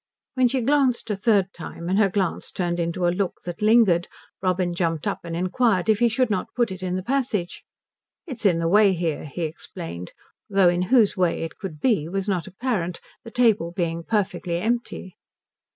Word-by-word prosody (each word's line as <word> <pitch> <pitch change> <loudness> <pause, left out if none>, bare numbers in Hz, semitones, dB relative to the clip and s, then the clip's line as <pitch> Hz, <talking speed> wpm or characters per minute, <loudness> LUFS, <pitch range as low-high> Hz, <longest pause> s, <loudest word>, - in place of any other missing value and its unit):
When 255 -1 +3
she 255 +1 0
glanced 260 -3 +2
a - - 0
third 195 -2 +2
time 170 0 -8
and 190 +3 +2
her 205 -2 +4
glance 190 -2 -1
turned 175 -1 -2
into 170 +1 -1
a 175 - +2
look 190 0 -1
that 175 +1 -6
lingered 210 -6 +4 0.3
Robin 185 -1 0
jumped 165 -3 -1
up - - -1
and 170 -1 -5
inquired 185 +2 +1
if 215 -1 +4
he 240 - +4
should 245 0 +1
not 190 - -2
put 240 -4 +1
it 185 0 -7
in 185 -1 -2
the 185 - -3
passage. 240 -7 -2 0.6
"It's 265 -9 -7
in 185 -5 +4
the 165 0 0
way 200 +2 +5
here," 165 -4 -2
he 160 +4 -5
explained; 160 - -6 0.4
though 195 -3 +5
in 175 0 0
whose 235 -6 +4
way 180 -4 +1
it 165 - -7
could 175 -7 -7
be 185 - +1
was 195 +2 -2
not 180 -5 -1
apparent, 190 -4 -2 0.2
the 230 - -9
table 225 -8 +2
being 170 -2 -2
perfectly 185 -4 -1
empty. 220 -2 -3
185 Hz, 195 wpm, -24 LUFS, 175-225 Hz, 0.6 s, way